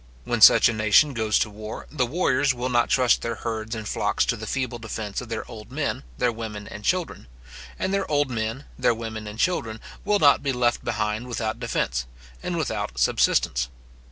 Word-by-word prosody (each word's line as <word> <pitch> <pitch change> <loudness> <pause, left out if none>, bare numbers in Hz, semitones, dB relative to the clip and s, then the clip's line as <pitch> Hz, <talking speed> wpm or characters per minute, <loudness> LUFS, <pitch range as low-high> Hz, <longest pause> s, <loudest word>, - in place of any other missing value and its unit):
When - - -2
such - - +9
a 120 - 0
nation 110 +7 +4
goes 110 -3 +1
to - - +1
war, 105 +1 -7
the 130 -5 0
warriors 135 -3 +2
will 125 +1 -2
not 120 -1 +2
trust 125 -3 +3
their 115 0 -2
herds 110 0 -4
and 110 -1 -5
flocks - - +1
to - - 0
the - - -7
feeble 125 -3 -2
defence 110 -2 -4
of 125 - -9
their 115 - -4
old 110 -3 -10
men, - - -2 0.2
their 120 - +2
women 110 -2 -6
and 105 - -9
children; 180 - -1 0.5
and 190 - -1
their 195 -1 0
old 145 -3 +1
men, 115 +4 -3
their 115 - +3
women 110 -1 -6
and 105 +1 -8
children, 115 -8 0 0.2
will 205 +1 +2
not 145 -7 +5
be 140 -2 -1
left 120 -1 +1
behind 110 +1 -2
without 115 -1 -3
defence, 60 - -1 0.3
and - - -3
without 60 - -2
subsistence. - - +2
115 Hz, 195 wpm, -25 LUFS, 110-130 Hz, 0.5 s, such